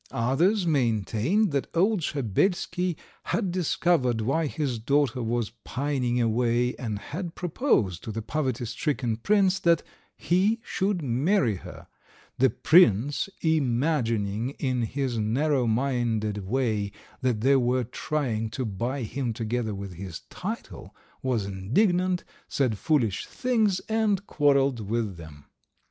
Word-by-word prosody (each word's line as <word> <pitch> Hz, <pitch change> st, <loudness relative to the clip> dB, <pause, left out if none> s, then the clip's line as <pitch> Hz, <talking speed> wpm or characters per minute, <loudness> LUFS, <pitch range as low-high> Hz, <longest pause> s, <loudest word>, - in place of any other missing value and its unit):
Others 170 Hz, -, +1 dB
maintained 130 Hz, -, +1 dB
that 140 Hz, -2 st, -1 dB
old 195 Hz, +3 st, +3 dB
Shabelsky 175 Hz, -, 0 dB, 0.3 s
had 195 Hz, -5 st, -1 dB
discovered 165 Hz, -8 st, +1 dB
why 135 Hz, +8 st, 0 dB
his 135 Hz, -5 st, -2 dB
daughter 135 Hz, +1 st, +1 dB
was 115 Hz, -1 st, -1 dB
pining 130 Hz, -3 st, -1 dB
away, 120 Hz, +1 st, +1 dB
and 110 Hz, -5 st, -3 dB
had 165 Hz, -, -6 dB
proposed 160 Hz, -, 0 dB
to 110 Hz, -, -4 dB
the 110 Hz, +1 st, -4 dB
poverty 130 Hz, -3 st, -2 dB
stricken 120 Hz, 0 st, -1 dB
prince 195 Hz, -, +2 dB
that 170 Hz, -2 st, +3 dB, 0.3 s
he 195 Hz, +6 st, +2 dB
should 190 Hz, -3 st, -1 dB
marry 130 Hz, -, +1 dB
her; -, -, -11 dB, 0.5 s
the 130 Hz, +1 st, +5 dB
prince, 140 Hz, -, +4 dB
imagining 125 Hz, -6 st, 0 dB
in 130 Hz, -3 st, -1 dB
his 125 Hz, 0 st, -2 dB
narrow 130 Hz, +4 st, +1 dB
minded 110 Hz, -5 st, 0 dB
way 110 Hz, -4 st, 0 dB, 0.3 s
that 125 Hz, -5 st, 0 dB
they 135 Hz, +3 st, +4 dB
were 125 Hz, 0 st, +1 dB
trying 120 Hz, -3 st, -2 dB
to 120 Hz, +3 st, -3 dB
buy 120 Hz, +6 st, -3 dB
him 120 Hz, +1 st, -3 dB
together 110 Hz, -1 st, -2 dB
with 100 Hz, -1 st, -6 dB
his 90 Hz, -1 st, -7 dB
title, -, -, -6 dB, 0.3 s
was 120 Hz, -6 st, 0 dB
indignant, 175 Hz, -, +1 dB, 0.2 s
said 120 Hz, -7 st, 0 dB
foolish 125 Hz, -, +1 dB
things, 220 Hz, -7 st, +1 dB
and 215 Hz, -3 st, 0 dB
quarrelled 140 Hz, -, +2 dB
with 105 Hz, -2 st, -2 dB
them. 75 Hz, -3 st, -12 dB
130 Hz, 125 wpm, -26 LUFS, 110-160 Hz, 0.5 s, the